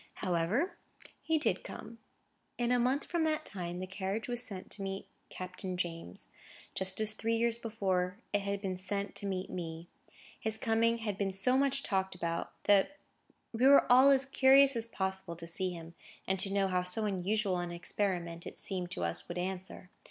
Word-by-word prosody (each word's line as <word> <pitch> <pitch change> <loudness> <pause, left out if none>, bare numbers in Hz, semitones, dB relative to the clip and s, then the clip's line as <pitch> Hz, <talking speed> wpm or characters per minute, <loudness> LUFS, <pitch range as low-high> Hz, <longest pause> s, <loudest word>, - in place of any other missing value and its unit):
However, 190 - 0 0.2
come - - -17
he 320 0 +1
did. 305 - 0 0.9
In 240 0 0
a 250 - +4
month 255 +4 +1
from 340 -2 0
that 310 -1 0
time, 175 -3 -4
the 185 - -4
carriage 195 +3 -3
was 245 -1 -1
sent 200 -7 -5
to 210 - -7
meet 195 0 -4 0.2
Captain 185 0 -5
James; 165 - -4 0.5
just 190 +1 -2
as 215 0 +5
three 225 +1 -1
years 235 0 +1
before 190 -5 -1 0.2
it 205 - +2
had 200 0 -2
been 190 -2 -2
sent 200 +2 -3
to 200 - -1
meet 190 -1 -3
me. 165 -1 -6 0.5
His 220 0 -2
coming 230 +1 +2
had 210 -4 -4
been 195 -1 0
so 195 +7 +2
much 275 0 +2
talked 190 -2 0
about 170 -1 -3
that 205 +8 +4 0.6
we 240 +4 +4
were 280 0 +8
all 260 +3 +8
as 270 -1 +4
curious 270 0 +6
as 230 0 -2
possible 190 -5 -3
to 170 0 -8
see 185 +3 -2
him, 170 -2 -8 0.3
and 190 0 0
to 195 - +3
know 195 -1 +2
how 180 -1 +1
so 180 +5 +2
unusual 195 0 0
an 175 0 -3
experiment, 175 -1 -2
as - - -7
it - - -25
seemed 180 -3 -3
to 90 - -3
us, 85 0 -1
would 175 - -5
answer. 185 0 -5
195 Hz, 190 wpm, -32 LUFS, 180-230 Hz, 0.9 s, were